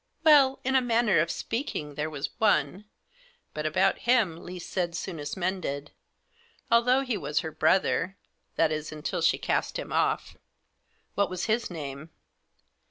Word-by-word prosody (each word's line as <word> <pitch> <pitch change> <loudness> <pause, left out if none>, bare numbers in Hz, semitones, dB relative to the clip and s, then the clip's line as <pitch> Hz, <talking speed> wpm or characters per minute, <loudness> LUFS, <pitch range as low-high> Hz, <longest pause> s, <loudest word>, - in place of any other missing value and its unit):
" - - -43
Well, 280 -4 +6
in 265 - 0
a 265 - +5
manner 235 -6 +3
of 165 +2 +1
speaking, 195 - -3
there 150 +2 -3
was 145 -2 -4
one; 195 - +2 0.7
but - - -2
about - - +2
him 215 -10 +3
least 180 -1 -8
said 175 -2 -1
soonest 160 -5 -5
mended; 175 -6 -3 0.8
although 250 +3 +4
he 250 -5 -2
was 150 -5 -1
her 160 -2 -5
brother— 185 +3 +1 0.4
that 160 -1 +3
is 155 0 -3
f. 155 - -7
until 150 - -3
she - - +3
cast - - -1
him - - -6
off." - - 0 0.4
" - - -43
What 200 0 +1
was 185 -1 -3
his 230 +1 0
name 150 -2 -7
180 Hz, 165 wpm, -27 LUFS, 155-230 Hz, 0.8 s, Well